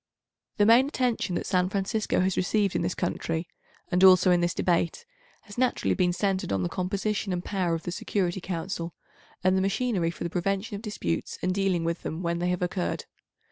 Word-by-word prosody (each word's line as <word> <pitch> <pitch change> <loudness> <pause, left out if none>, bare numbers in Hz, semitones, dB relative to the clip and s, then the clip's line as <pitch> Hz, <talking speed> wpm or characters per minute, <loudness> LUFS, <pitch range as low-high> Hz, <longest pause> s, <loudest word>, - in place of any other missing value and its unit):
The 205 - +4
main 235 +5 +6
attention 245 - -1
that - - -2
San 180 -1 +1
Francisco 200 +1 0
has 185 0 +1
received 200 +1 +1
in - - +1
this 175 +1 -1
country, 165 -1 -2 0.4
and 180 +1 +3
also 185 -1 +7
in 175 -1 +4
this 175 0 0
Debate, 170 - 0 0.4
has 205 +2 -9
naturally 255 -1 +1
been 180 -2 +2
centred 190 - -1
on 95 -2 0
the 90 - -1
composition 200 +2 -2
and 180 -1 -3
power 180 -4 0
of 165 - -6
the 175 - -4
Security 185 0 -1
Council, 170 -1 -4 0.5
and 185 +1 +4
the 190 - +2
machinery 195 -3 0
for 170 - -6
the 170 - -3
prevention 195 +4 -1
of 200 - -6
disputes 145 - -3
and 185 +1 +1
dealing 190 -3 +1
with 170 +1 -2
them 160 +3 -4
when 170 0 -1
they 175 +1 0
have 180 0 -1
occurred. 180 0 -2
185 Hz, 200 wpm, -27 LUFS, 175-200 Hz, 0.5 s, also